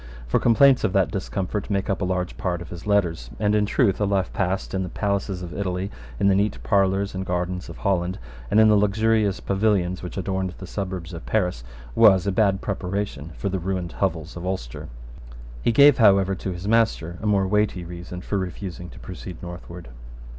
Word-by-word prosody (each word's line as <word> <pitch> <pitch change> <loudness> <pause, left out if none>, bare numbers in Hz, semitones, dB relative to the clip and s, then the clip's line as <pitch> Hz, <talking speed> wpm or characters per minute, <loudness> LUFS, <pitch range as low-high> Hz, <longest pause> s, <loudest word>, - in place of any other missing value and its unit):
For - - +1
complaints 130 +3 +5
of 95 - +1
that 95 -2 +2
discomfort 100 0 -3
make 100 -1 0
up 100 0 -1
a - - +1
large 90 -1 -2
part 90 -3 -2
of 85 - -9
his 85 +3 -9
letters; 85 -11 +1
and, 105 -1 +2
in 105 -1 +2
truth, 105 -3 +2
a - - +3
life 95 -2 0
passed 95 +1 -1
in 95 - 0
the 90 - -3
palaces 100 -1 -2
of 85 - -7
Italy, 95 0 -2 0.3
in - - +3
the 100 - +5
neat 100 +1 +1
parlours 100 0 +2
and 95 0 -3
gardens 90 0 -3
of - - -9
Holland, 90 -2 0 0.3
and 105 - +4
in 110 - +7
the 105 - +5
luxurious 105 0 +2
pavilions 95 -3 +1
which 90 - -7
adorned 95 -1 -2
the 95 - -8
suburbs 95 -2 -5
of 85 - -8
Paris, 90 - 0 0.3
was 95 - +6
a 100 - +1
bad 95 -1 +2
preparation 95 -6 -3
for - - -3
the 95 -1 -1
ruined 90 -1 -3
hovels 85 -4 -2
of 85 - -7
Ulster. 90 -11 -4 0.7
He - - +2
gave, 140 +3 +7
however, 100 -3 +5
to 95 0 -4
his 90 +2 -6
master 105 -7 +1
a 110 - -2
more 100 -2 +3
weighty 105 -3 +1
reason 90 +1 -7
for 100 +2 -2
refusing 90 -1 -6
to - - -13
proceed 90 -2 -8
northward. 85 -3 -9
95 Hz, 200 wpm, -24 LUFS, 90-100 Hz, 0.7 s, in